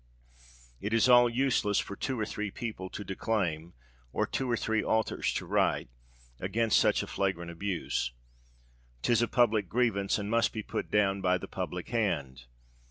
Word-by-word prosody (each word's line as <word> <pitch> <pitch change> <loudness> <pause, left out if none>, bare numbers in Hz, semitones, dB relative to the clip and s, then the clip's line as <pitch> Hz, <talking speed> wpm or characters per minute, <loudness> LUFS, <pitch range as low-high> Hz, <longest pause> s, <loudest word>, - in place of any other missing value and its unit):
It 105 +2 -3
is 115 +2 +4
all 120 -1 +7
useless 120 -4 +1
for 100 - -2
two 130 +3 -3
or 110 - 0
three 105 0 -4
people 100 -3 -5
to 105 - -6
declaim, 90 -5 -2 0.4
or - - 0
two 130 -1 -2
or 120 - +2
three 110 -1 0
authors 110 0 0
to - - -2
write, - - +1 0.5
against 110 +4 +2
such - - +3
a - - -4
flagrant 85 -3 -2
abuse. 85 -8 -2 0.9
'Tis 120 -1 +3
a 120 - +2
public 110 -7 +2
grievance, 110 -5 +1
and 100 -1 -4
must 115 +2 +2
be 110 -2 -4
put - - -4
down 100 -2 +2
by 90 -1 +3
the - - -8
public - - -5
hand! 75 - -1
105 Hz, 165 wpm, -30 LUFS, 95-115 Hz, 0.9 s, all